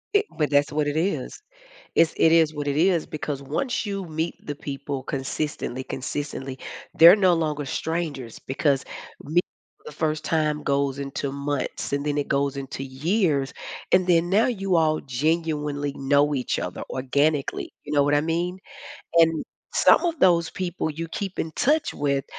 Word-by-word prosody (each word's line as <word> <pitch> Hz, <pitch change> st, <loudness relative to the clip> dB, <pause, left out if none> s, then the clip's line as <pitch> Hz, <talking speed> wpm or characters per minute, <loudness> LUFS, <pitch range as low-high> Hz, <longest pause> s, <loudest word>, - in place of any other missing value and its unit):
I 410 Hz, -, +5 dB
but 150 Hz, -2 st, +1 dB
that's 145 Hz, 0 st, +3 dB
what 150 Hz, 0 st, 0 dB
it 145 Hz, +2 st, -1 dB
is. 160 Hz, -6 st, -1 dB, 0.6 s
It's 165 Hz, -1 st, +4 dB
it 165 Hz, -, +5 dB
is 160 Hz, -2 st, +4 dB
what 145 Hz, -1 st, -3 dB
it 140 Hz, -, 0 dB
is 170 Hz, +1 st, +3 dB
because 145 Hz, -2 st, -4 dB
once 210 Hz, -, -2 dB
you 195 Hz, -1 st, -3 dB
meet 160 Hz, +1 st, -2 dB
the 145 Hz, -, -3 dB
people 140 Hz, -1 st, -5 dB
consistently, 135 Hz, -1 st, -3 dB
consistently, 135 Hz, -1 st, -5 dB, 0.4 s
they're 170 Hz, +4 st, +9 dB
no 185 Hz, -4 st, +4 dB
longer 150 Hz, -3 st, -1 dB
strangers 150 Hz, -6 st, -3 dB
because 135 Hz, 0 st, 0 dB, 0.4 s
mee 160 Hz, +5 st, +2 dB, 0.4 s
for -, -, -11 dB
the -, -, -13 dB
first 155 Hz, -1 st, -1 dB
time 155 Hz, -2 st, 0 dB
goes 140 Hz, -1 st, 0 dB
into 140 Hz, 0 st, -3 dB
months, 140 Hz, -1 st, -3 dB
and 140 Hz, 0 st, 0 dB
then 150 Hz, 0 st, 0 dB
it 145 Hz, -, -2 dB
goes 140 Hz, 0 st, 0 dB
into 135 Hz, 0 st, -5 dB
years. 145 Hz, 0 st, 0 dB, 0.4 s
And 185 Hz, 0 st, +5 dB
then 175 Hz, -1 st, +3 dB
now 210 Hz, +4 st, +4 dB
you 195 Hz, -6 st, 0 dB
all 155 Hz, -1 st, +2 dB
genuinely 150 Hz, +1 st, -1 dB
know 145 Hz, +2 st, +2 dB
each 125 Hz, -, -1 dB
other -, -, -4 dB
organically. 140 Hz, +3 st, 0 dB
You 145 Hz, -, -6 dB
know 145 Hz, -1 st, +4 dB
what 145 Hz, +1 st, +2 dB
I 145 Hz, -, +4 dB
mean? 170 Hz, +4 st, -1 dB, 0.6 s
And 165 Hz, -1 st, +4 dB, 0.3 s
some -, -, +5 dB
of 335 Hz, -3 st, -1 dB
those 170 Hz, -6 st, +4 dB
people 180 Hz, -3 st, -3 dB
you 165 Hz, +2 st, -5 dB
keep 195 Hz, 0 st, -5 dB
in 160 Hz, -, -2 dB
touch 300 Hz, -, +1 dB
with, 140 Hz, -2 st, 0 dB
150 Hz, 170 wpm, -24 LUFS, 140-165 Hz, 0.6 s, they're